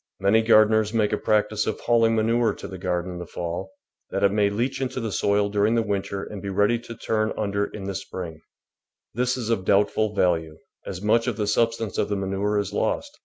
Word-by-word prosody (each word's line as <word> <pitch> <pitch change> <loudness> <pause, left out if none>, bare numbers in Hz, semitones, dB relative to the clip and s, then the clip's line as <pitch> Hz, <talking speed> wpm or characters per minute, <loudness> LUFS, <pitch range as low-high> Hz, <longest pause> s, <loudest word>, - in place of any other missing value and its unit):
Many 100 +3 +4
gardeners 110 -1 +4
make 105 -2 +2
a - - +2
practice 105 0 +1
of 110 - -2
hauling 115 -1 +3
manure 115 +1 +2
to - - -8
the 95 - -8
garden 90 -1 -2
in 90 - -7
the 90 - -7
fall, 85 +3 -5 0.4
that - - -2
it 100 - +5
may 105 0 +2
leach 120 +7 -2
into 130 -1 -2
the 115 -3 -3
soil 100 +1 +2
during 105 +2 +2
the 115 - +2
winter 100 -1 -3
and 105 -2 -7
be 100 - -5
ready 105 +4 +2
to 115 0 -9
turn 110 -1 0
under 100 -1 0
in 105 - -8
the 100 0 -3
spring; 90 -4 -6 0.7
this 125 +2 0
is 115 -2 -2
of 105 -5 0
doubtful 105 +2 +2
value, 80 -5 +1 0.3
as 95 0 -6
much 115 +3 +3
of 120 -4 -1
the 105 - 0
substance 115 0 0
of - - 0
the 100 - 0
manure 100 +2 -1
is 100 -2 -2
lost. - - -1
105 Hz, 220 wpm, -24 LUFS, 95-110 Hz, 0.7 s, it